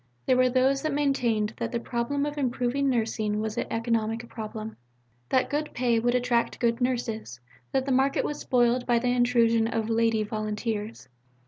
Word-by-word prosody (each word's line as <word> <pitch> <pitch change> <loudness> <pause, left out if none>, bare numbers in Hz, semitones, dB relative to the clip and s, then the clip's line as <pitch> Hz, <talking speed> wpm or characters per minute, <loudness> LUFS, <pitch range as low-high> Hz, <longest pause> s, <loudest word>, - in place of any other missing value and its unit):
There 255 - +3
were 255 0 +4
those 265 +2 +2
who 310 - -1
maintained 245 -7 +1
that 230 -1 -3
the 235 - -1
problem 245 +5 -2
of 295 0 -4
improving 265 0 0
Nursing 220 -3 0
was 215 0 -3
an 240 - -2
economic 230 0 -1
problem; 220 0 -7 0.5
that 260 - +2
good 300 +1 -1
pay 240 -2 +2
would 240 +2 +1
attract 240 -1 +1
good 235 0 +1
nurses; 230 - -2 0.3
that 265 -1 0
the 275 - -1
market 265 +2 +2
was 295 - -3
spoiled 245 0 +2
by 240 -1 +3
the 245 +1 0
intrusion 235 -2 +3
of 225 -1 -2
"lady" 225 -1 +2
volunteers. 215 - -4
235 Hz, 175 wpm, -27 LUFS, 225-255 Hz, 0.5 s, were